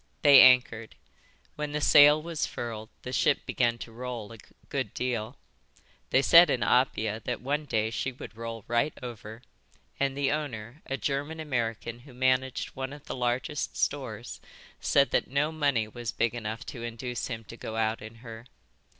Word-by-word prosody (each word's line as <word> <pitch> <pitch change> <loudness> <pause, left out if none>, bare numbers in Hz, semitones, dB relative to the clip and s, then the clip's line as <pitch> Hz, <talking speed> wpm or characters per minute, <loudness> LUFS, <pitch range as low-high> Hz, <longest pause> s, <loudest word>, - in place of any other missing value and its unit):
They 145 -2 +9
anchored. 115 - +4 0.6
When 150 -1 -4
the 150 - 0
sail 145 0 +7
was 165 0 -3
furled 110 -2 -6
the 125 - -6
ship 145 - +2
began 120 -2 +1
to 115 - -9
roll 120 -2 -6
a 115 - -13 0.3
good - - -3
deal. 120 0 -3 0.7
They 135 - +3
said 170 +4 +8
in 120 - +1
Apia 110 -4 +1
that 120 -3 -2
one 145 +5 -2
day 110 -4 0
she 130 +4 -2
would 125 -3 -10
roll 115 -1 -7
right 120 +6 +1
over; 115 -1 -8 0.6
and 140 0 0
the 140 -1 +1
owner, 135 -3 -4
a 135 - -2
German 145 +4 -3
American 120 -5 -3
who 125 0 -15
managed 130 0 +1
one 130 +1 -6
of 145 - -12
the - - -5
largest 125 +3 -2
stores, 120 -5 -3 0.4
said 140 0 +3
that - - +1
no 140 +3 0
money 140 -8 +1
was 115 0 -5
big 115 0 0
enough 110 -1 -5
to 120 - -8
induce 120 +1 -4
him 115 -3 -5
to 115 - -11
go 110 -1 -7
out 110 0 0
in 110 +1 -10
her. 115 +1 -9
125 Hz, 175 wpm, -28 LUFS, 115-140 Hz, 0.7 s, They